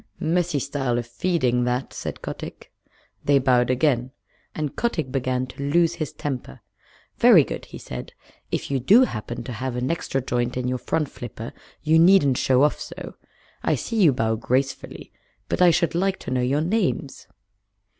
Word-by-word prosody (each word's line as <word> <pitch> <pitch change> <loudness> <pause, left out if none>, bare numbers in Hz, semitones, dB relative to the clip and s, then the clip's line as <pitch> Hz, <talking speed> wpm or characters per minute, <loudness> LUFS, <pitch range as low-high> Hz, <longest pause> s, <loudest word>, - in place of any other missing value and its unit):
"Messy 175 -1 0
style 135 -3 -1
of 120 - -2
feeding, 125 -3 0
that," 125 +1 -2
said - - -6
Kotick. - - -7 0.5
They 140 -1 +4
bowed 125 -2 +3
again, 130 -1 +1 0.5
and 150 -2 -3
Kotick 160 - -1
began 130 -1 -1
to 140 +2 -5
lose 170 +2 +3
his 155 -4 -4
temper. 125 - -5 0.6
"Very - - +7
good," - - -6
he - - -10
said. - - -8 0.4
"If - - -2
you 135 - +1
do 210 - +6
happen 120 - -4
to 130 - -7
have 125 +2 -4
an 125 +3 -1
extra 165 -5 -2
joint 120 -1 -2
in 125 0 -1
your 125 0 -1
front 155 +3 -1
flipper 120 -3 -8 0.3
you 160 +1 +4
needn't 165 -7 +5
show 130 +1 +3
off 150 - +2
so. - - -8 0.5
I - - +1
see 225 -2 -2
you 165 -6 +7
bow 110 -3 0
gracefully, 130 +3 -2 0.4
but - - -1
I 180 - +8
should 170 -1 +2
like 190 +3 +1
to - - -6
know 130 -1 +1
your 135 +4 +1
names." 175 - -1
135 Hz, 175 wpm, -24 LUFS, 125-160 Hz, 0.6 s, I